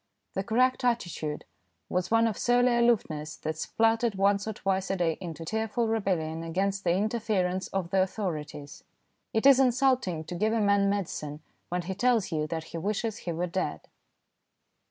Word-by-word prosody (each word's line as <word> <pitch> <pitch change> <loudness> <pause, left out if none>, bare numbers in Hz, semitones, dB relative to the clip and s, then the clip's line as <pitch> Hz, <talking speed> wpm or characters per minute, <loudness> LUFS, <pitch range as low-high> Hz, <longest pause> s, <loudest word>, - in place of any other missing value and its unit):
The 195 - -1
correct 255 +4 +2
attitude 175 -11 -1 0.4
was 180 0 -1
one 230 0 +4
of 225 -3 0
surly 245 0 +3
aloofness 190 -11 +1
that 155 0 -4
spluttered 225 +5 +1
once 200 +1 +2
or 220 - -2
twice 195 -1 -1
a 195 - +1
day 170 -3 +1
into 165 -2 -6
tearful 220 +4 -1
rebellion 180 -8 -1
against 190 +4 -1
the 170 - +2
interference 195 -3 0
of 185 -3 -3
the 190 - +3
authorities. 155 -7 -4 0.5
It 220 +3 0
is 275 -1 +8
insulting 255 - +2
to 170 - -7
give 215 +5 +1
a 230 - +1
man 200 -1 +3
medicine 155 -6 -3 0.3
when 180 0 -2
he 190 +3 -3
tells 225 0 +1
you 155 -1 -1
that 160 0 -3
he 165 - -3
wishes 215 +4 -2
he 175 - -5
were 170 +2 -1
dead. 185 +2 -2
195 Hz, 170 wpm, -28 LUFS, 170-225 Hz, 0.5 s, is